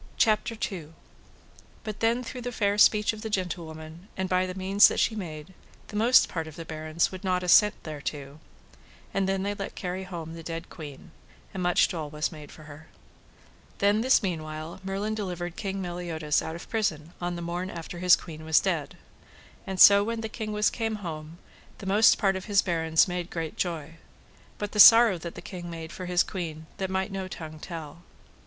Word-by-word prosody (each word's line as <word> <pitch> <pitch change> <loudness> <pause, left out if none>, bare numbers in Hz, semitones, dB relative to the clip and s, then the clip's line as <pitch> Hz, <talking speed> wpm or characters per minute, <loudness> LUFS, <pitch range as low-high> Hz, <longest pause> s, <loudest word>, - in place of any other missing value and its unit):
But 215 -2 -6
then 230 +2 +1
through 250 +1 -7
the 245 +1 -4
fair 205 -2 0
speech 210 0 +5
of 215 - -9
the 220 - -4
gentlewoman, 170 -3 -5
and 190 0 -1
by 185 0 +1
the 185 - -6
means 195 +2 +6
that - - -2
she 220 - +2
made, 160 -4 -7 0.4
the 210 - -9
most 235 +4 +5
part 165 -2 -4
of 155 - -10
the 165 -1 -8
barons 155 +1 -1
would 185 +1 -8
not 180 -1 0
assent 210 +3 +6
thereto. 145 -1 -6 0.7
And 195 -1 0
then 195 0 0
they 200 +1 -1
let 200 -1 -6
carry 185 +1 -4
home 165 -3 -7
the 165 - -8
dead 165 +1 -6
queen, 150 -5 -10 0.4
and 190 - -4
much 180 0 +3
dole 155 -4 -5
was 150 +1 -2
made 150 -3 -11
for 155 - -13
her. 155 +1 -12 0.9
Then 205 +2 +3
this 260 -1 +4
meanwhile 155 -2 -4
Merlin 195 +3 -2
delivered 180 -5 -4
King 195 -2 -4
Meliodas 170 -4 -1
out 160 - -5
of 170 - -9
prison 170 -8 -2
on 175 0 -2
the 170 - -5
morn 175 +2 -3
after 170 0 -7
his 180 0 +6
queen 160 -2 -10
was 160 0 +4
dead. - - -2 0.7
And 190 -1 -4
so 200 0 +9
when 230 +1 -3
the 220 - -4
king 215 -1 -5
was 210 0 +2
come 225 -2 -2
home 155 0 -7 0.4
the - - -10
most 205 +4 +5
part 195 -3 +2
of 190 +2 -6
the 205 -2 +4
barons 160 -2 +3
made 180 -1 -4
great 165 -2 -4
joy. 165 -2 -3 0.6
But 205 -1 -4
the 210 - -3
sorrow 225 -4 +9
that 170 +1 -7
the - - -9
king 175 -2 -7
made 165 -1 -7
for 185 0 -7
his 180 0 +3
queen 160 -5 -6
that 190 -2 -2
might 190 +2 -1
no 190 -1 -4
tongue 155 -3 -8
tell. 165 -1 -8
180 Hz, 195 wpm, -27 LUFS, 160-200 Hz, 0.9 s, so